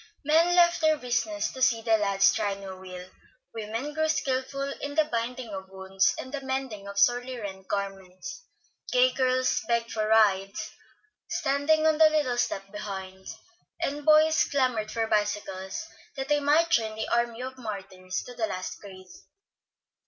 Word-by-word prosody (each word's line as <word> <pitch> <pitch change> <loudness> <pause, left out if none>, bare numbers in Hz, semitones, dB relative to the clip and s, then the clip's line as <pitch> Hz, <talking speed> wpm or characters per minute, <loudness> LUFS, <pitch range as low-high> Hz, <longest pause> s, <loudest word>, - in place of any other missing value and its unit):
Men 330 +4 +4
left 345 -1 +5
their 315 -1 +4
business 250 +5 -1
to 260 - -9
see 240 -3 +3
the 225 -1 +4
lads 200 -2 +3
try 200 -1 -1
new 195 -1 -8
wheels, 185 -1 -10 0.4
women 225 +6 -4
grew 315 0 0
skilful 275 -2 -1
in 285 0 -4
the 315 0 +4
binding 240 -1 -3
of 190 0 -7
wounds 190 0 0
and 260 - -7
the 280 - -3
mending 265 -7 -4
of 200 0 -8
sorely 245 +3 +2
rent 190 -4 -7
garments, 195 - -5 0.5
gay - - +5
girls 255 -1 +1
begged 235 -1 0
for 215 -1 -1
rides, 215 -1 +2 0.6
standing 290 +3 +1
on 315 -1 +3
the 315 -1 +8
little 290 -6 0
step 195 -4 -2
behind, 190 -2 -7 0.5
and 290 +1 -2
boys 310 +1 +5
clamored 255 -6 0
for 225 0 0
bicycles 210 - -2 0.3
that 270 0 -5
they 295 0 +3
might 300 +4 +3
join 220 -1 +2
the 220 - -3
army 235 0 0
of 260 0 -7
martyrs 190 -5 -5
to 250 - -10
the 230 -2 -1
last 185 -2 -5
craze. 185 -2 -13
235 Hz, 160 wpm, -27 LUFS, 200-280 Hz, 0.6 s, the